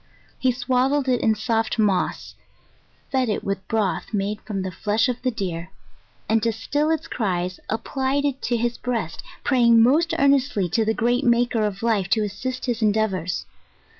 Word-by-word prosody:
He 260 Hz, -, +3 dB
swaddled 260 Hz, +3 st, +1 dB
it 250 Hz, -2 st, +2 dB
in 220 Hz, -1 st, +3 dB
soft 225 Hz, +1 st, -1 dB
moss, 200 Hz, -4 st, 0 dB, 0.8 s
fed 260 Hz, -3 st, +1 dB
it 210 Hz, -, -1 dB
with 195 Hz, -1 st, -3 dB
broth 210 Hz, -3 st, -1 dB
made 205 Hz, +1 st, -2 dB
from 195 Hz, -3 st, -4 dB
the 190 Hz, -, -4 dB
flesh 210 Hz, +7 st, +1 dB
of 250 Hz, -1 st, -3 dB
the 255 Hz, -, +1 dB
deer, 180 Hz, -7 st, -4 dB, 0.6 s
and 220 Hz, 0 st, +2 dB
to 230 Hz, -, +1 dB
still 290 Hz, +7 st, -1 dB
its 320 Hz, -2 st, -1 dB
cries 180 Hz, -4 st, -2 dB
applied 265 Hz, +5 st, -1 dB
it 275 Hz, -2 st, -1 dB
to 240 Hz, -, 0 dB
his 240 Hz, +1 st, -1 dB
breast, 230 Hz, -10 st, -3 dB, 0.2 s
praying 235 Hz, -4 st, +5 dB
most 325 Hz, +7 st, +3 dB
earnestly 275 Hz, -, +2 dB
to 220 Hz, +6 st, +1 dB
the 220 Hz, +1 st, 0 dB
great 245 Hz, +3 st, +1 dB
Maker 240 Hz, -2 st, +2 dB
of 205 Hz, 0 st, -3 dB
Life, 210 Hz, -5 st, +1 dB
to 215 Hz, -, +1 dB
assist 250 Hz, +6 st, -4 dB
his 240 Hz, -2 st, -2 dB
endeavours. 205 Hz, -5 st, 0 dB
225 Hz, 170 wpm, -23 LUFS, 205-255 Hz, 0.8 s, praying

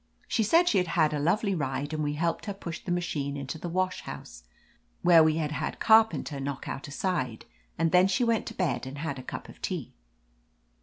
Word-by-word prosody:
She -, -, +1 dB
said 330 Hz, -, +4 dB
she 205 Hz, -, +4 dB
had 180 Hz, -, 0 dB
had 155 Hz, -2 st, +4 dB
a 150 Hz, -, -1 dB
lovely 195 Hz, +7 st, +1 dB
ride, 140 Hz, -2 st, -2 dB
and 155 Hz, -1 st, -1 dB
we 145 Hz, 0 st, -1 dB
helped 165 Hz, +6 st, -1 dB
her 200 Hz, -, -3 dB
push 170 Hz, -4 st, -7 dB
the 180 Hz, -, -4 dB
machine 145 Hz, -5 st, -2 dB
into 140 Hz, +3 st, -5 dB
the 175 Hz, -, -5 dB
wash 185 Hz, +2 st, -1 dB
house, -, -, -9 dB, 0.6 s
where 170 Hz, -2 st, +7 dB
we 155 Hz, 0 st, +3 dB
had 155 Hz, -2 st, -1 dB
had -, -, -3 dB
Carpenter 220 Hz, -10 st, +4 dB
knock 140 Hz, 0 st, -4 dB
out 135 Hz, -, -5 dB
a -, -, -9 dB
side, 140 Hz, -, -2 dB, 0.3 s
and 165 Hz, 0 st, +1 dB
then 180 Hz, +1 st, +6 dB
she 195 Hz, +5 st, +1 dB
went 230 Hz, -2 st, +1 dB
to -, -, -6 dB
bed 175 Hz, -7 st, -1 dB
and 135 Hz, +2 st, -7 dB
had 145 Hz, -3 st, -3 dB
a -, -, -6 dB
cup -, -, -7 dB
of -, -, -14 dB
tea. -, -, -4 dB
165 Hz, 220 wpm, -28 LUFS, 145-185 Hz, 0.6 s, where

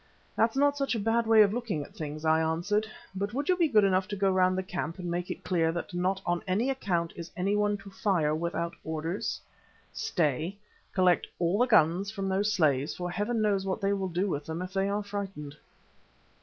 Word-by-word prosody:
"That's 225 Hz, +1 st, +2 dB
not 285 Hz, +1 st, +3 dB
such 275 Hz, -3 st, 0 dB
a -, -, -1 dB
bad 225 Hz, +2 st, +1 dB
way 220 Hz, -1 st, +8 dB
of 200 Hz, 0 st, +1 dB
looking 225 Hz, -11 st, -2 dB
at 195 Hz, -, -14 dB
things," 155 Hz, -4 st, -6 dB
I 160 Hz, 0 st, +4 dB
answered, 175 Hz, +7 st, 0 dB, 0.3 s
"but 200 Hz, +4 st, -3 dB
would 285 Hz, +2 st, -2 dB
you 365 Hz, -, +5 dB
be 345 Hz, -2 st, +3 dB
good 220 Hz, -7 st, +4 dB
enough 185 Hz, -1 st, +2 dB
to 205 Hz, -, -4 dB
go 195 Hz, -1 st, +2 dB
round 185 Hz, 0 st, +3 dB
the 190 Hz, -, -1 dB
camp 175 Hz, -2 st, -4 dB
and 175 Hz, -2 st, -4 dB
make 175 Hz, +1 st, -2 dB
it -, -, -5 dB
clear 165 Hz, -3 st, +1 dB
that 175 Hz, +2 st, -5 dB
not 185 Hz, +2 st, 0 dB
on 175 Hz, 0 st, 0 dB
any 215 Hz, +9 st, +1 dB
account 175 Hz, -10 st, -1 dB
is 170 Hz, -1 st, -7 dB
anyone 205 Hz, +2 st, +1 dB
to 195 Hz, 0 st, -12 dB
fire 180 Hz, -7 st, +1 dB
without 170 Hz, +1 st, -2 dB
orders. 160 Hz, +4 st, -3 dB, 0.5 s
Stay, 165 Hz, +3 st, -1 dB, 0.3 s
collect 185 Hz, -2 st, +3 dB
all 175 Hz, +4 st, +1 dB
the 245 Hz, -, +4 dB
guns 185 Hz, -2 st, +3 dB
from 195 Hz, -2 st, -3 dB
those 200 Hz, +3 st, +1 dB
slaves, 150 Hz, -8 st, +2 dB
for 180 Hz, 0 st, -4 dB
heaven 215 Hz, +5 st, -1 dB
knows 200 Hz, -2 st, +2 dB
what 190 Hz, +1 st, -2 dB
they 200 Hz, -1 st, +1 dB
will 195 Hz, -2 st, -2 dB
do 180 Hz, +3 st, 0 dB
with 145 Hz, -6 st, -3 dB
them 160 Hz, +3 st, -3 dB
if 185 Hz, 0 st, -8 dB
they 195 Hz, 0 st, +1 dB
are 205 Hz, +1 st, -1 dB
frightened!" 195 Hz, -8 st, -6 dB
190 Hz, 215 wpm, -29 LUFS, 170-205 Hz, 0.5 s, way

